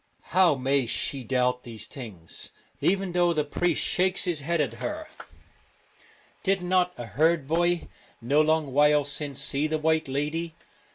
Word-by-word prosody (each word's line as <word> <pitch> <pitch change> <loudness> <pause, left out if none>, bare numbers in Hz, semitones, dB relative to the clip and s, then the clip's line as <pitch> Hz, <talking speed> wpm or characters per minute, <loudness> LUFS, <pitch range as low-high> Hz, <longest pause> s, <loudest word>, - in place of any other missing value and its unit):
How 180 -4 +5
may 135 -1 +1
she 135 +3 -2
doubt 125 +1 +1
these 110 -3 -7
things, 105 - -8 0.3
even 195 0 +1
though 175 -1 +3
the 155 -2 +1
priest 170 +3 0
shakes 185 +1 +1
his 175 -4 0
head 165 +4 -1
at 135 -7 0
her? 310 +1 -4 1.3
Did 195 -2 +1
not 180 0 +2
a 120 - -5
herd 155 +5 +2
boy, 175 +2 +1 0.3
no 140 +6 +3
long 155 -3 +1
while 150 0 +4
since, 145 -1 -4
see 145 +3 0
the 155 0 0
White 160 0 +1
Lady? 150 +4 -2
155 Hz, 155 wpm, -26 LUFS, 135-175 Hz, 1.3 s, How